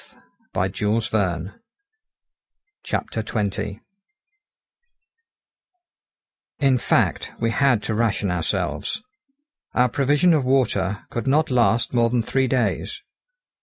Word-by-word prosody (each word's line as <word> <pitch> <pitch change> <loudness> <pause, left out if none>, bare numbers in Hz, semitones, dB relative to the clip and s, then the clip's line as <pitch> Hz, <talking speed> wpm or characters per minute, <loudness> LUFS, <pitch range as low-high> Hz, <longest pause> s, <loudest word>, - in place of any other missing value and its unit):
THE - - +1
FIRST 105 +3 -1
SIGNS 95 -3 0 1.4
OF - - 0
DISTRESS 105 -3 -2 2.8
In 135 -3 +3
fact, - - +1
we 115 0 +1
had 125 -5 +2
to 110 - -2
ration 105 -3 0
ourselves. 90 - -2 0.7
Our 125 0 +4
provision 145 +7 +3
of 150 -4 +2
water 105 -7 +1
could 120 +2 -3
not 150 +2 +2
last 120 -1 +2
more 120 -1 +3
than 120 -1 +1
three 130 +3 +1
days. 130 0 -1
115 Hz, 100 wpm, -23 LUFS, 105-130 Hz, 2.8 s, Our